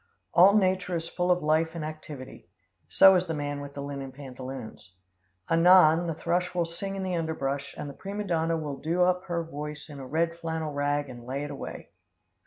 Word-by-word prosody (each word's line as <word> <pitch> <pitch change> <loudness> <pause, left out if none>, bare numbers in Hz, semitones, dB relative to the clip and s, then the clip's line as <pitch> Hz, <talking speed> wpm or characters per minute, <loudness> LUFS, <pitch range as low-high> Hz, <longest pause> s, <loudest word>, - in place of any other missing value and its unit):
All 190 +4 +7
nature 185 -2 +1
is 165 0 -2
full 180 +1 -1
of 180 -2 +3
life 160 +2 +2
and 160 -2 -4
activity. 150 - -9 0.4
So 190 - +8
is 180 0 +1
the 165 - -2
man 145 -1 -3
with 140 0 -9
the 140 - -5
linen 140 -1 -5
pantaloons. 130 -7 -9 0.5
Anon, 170 0 +6
the 165 - -2
thrush 180 +2 -1
will 175 -1 +2
sing 195 +4 -5
in 195 - -3
the 185 -1 -1
underbrush, 140 -4 -2
and - - -5
the 140 - -7
prima 200 +6 -5
donna 165 -3 0
will 150 -3 -4
do 170 +5 +1
up 180 +1 +1
her 170 -2 -2
voice 150 -1 -7
in 145 -2 -9
a 130 - -7
red 165 +4 0
flannel 160 -2 -3
rag 145 0 0
and 120 -2 -10
lay 135 +3 -3
it 145 - -5
away. 140 - -7
160 Hz, 200 wpm, -28 LUFS, 145-175 Hz, 0.5 s, So